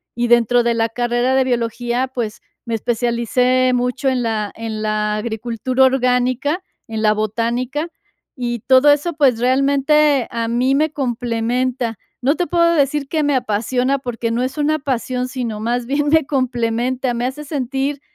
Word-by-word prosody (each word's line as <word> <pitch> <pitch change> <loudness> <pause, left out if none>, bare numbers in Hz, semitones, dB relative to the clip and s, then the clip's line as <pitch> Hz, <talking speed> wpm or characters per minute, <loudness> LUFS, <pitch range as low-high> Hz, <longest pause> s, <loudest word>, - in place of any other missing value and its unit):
y 240 +1 0
dentro 240 0 +4
de 235 0 +1
la 225 0 +1
carrera 240 +2 0
de 265 - +4
biología, 240 +1 -1
pues, 230 -3 -3 0.3
me 230 -1 -2
especialicé 245 +2 +1
mucho 250 +2 0
en 255 -1 0
la 215 -3 -2
en 220 -1 -5
la 210 0 0
agricultura 235 +4 0
orgánica, 255 +5 +1 0.3
en 220 -1 -4
la 215 -1 +4
botánica, 235 - -2 0.5
y 240 -2 -3
todo 260 +5 +5
eso, 295 +4 +1
pues, 275 -7 +2
realmente 275 +2 +3
a 230 -1 -2
mí 250 +3 +1
me 310 +2 +1
complementa, 245 -1 -1 0.3
no 280 +5 +2
te 355 - -1
puedo 340 -1 +3
decir 280 -1 +1
que 310 0 0
me 290 -1 +1
apasiona 250 +3 0
porque 240 -3 -4
no 235 +2 0
es 260 +4 -4
una 300 +1 +1
pasión, 255 -2 -2
sino 240 -5 -4
más 240 +1 -1
bien 290 +3 0
me 320 -1 +4
complementa, 250 -1 -1
me 240 +1 -2
hace 265 +4 -4
sentir 275 0 -2
250 Hz, 160 wpm, -19 LUFS, 235-270 Hz, 0.5 s, todo